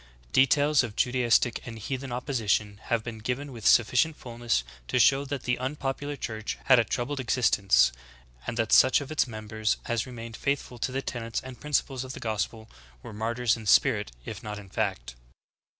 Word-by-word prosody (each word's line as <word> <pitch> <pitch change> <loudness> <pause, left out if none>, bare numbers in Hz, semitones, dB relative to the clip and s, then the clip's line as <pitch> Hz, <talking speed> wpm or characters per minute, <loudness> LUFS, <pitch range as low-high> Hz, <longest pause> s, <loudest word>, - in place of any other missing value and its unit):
Details 145 +2 +4
of 115 -5 -5
Judaistic 120 -1 +2
and 115 -2 -8
heathen 130 +4 -5
opposition 110 -5 -1
have 115 -2 0
been 115 -1 -7
given 125 +5 -3
with 115 -4 -3
sufficient 125 +7 +4
fulness 120 - -1 0.2
to - - 0
show 140 0 +4
that 140 -2 -4
the 125 0 0
un 130 +3 -2
popular 145 +1 -3
Church 110 -5 -5
had 130 -2 +6
a - - +4
troubled 130 +5 -3
existence, 115 - +3 0.6
and 115 - -3
that 115 -2 +1
such 130 - +7
of 145 0 -7
its 155 - +1
members 110 -1 -2
as 120 +1 -1
remained 115 -2 -8
faithful 140 -3 -2
to 130 - -1
the 135 +1 -3
tenets 115 -2 -3
and 130 -1 -10
principles 140 -3 -1
o4 130 0 -7
the - - -8
gospel 110 0 -3 0.4
were - - -9
martyrs 115 +2 0
in 110 -2 -9
spirit - - +4
if 105 - -6
not 105 -1 -6
in 100 -2 -11
fact. 95 - -2
120 Hz, 180 wpm, -27 LUFS, 110-130 Hz, 0.6 s, such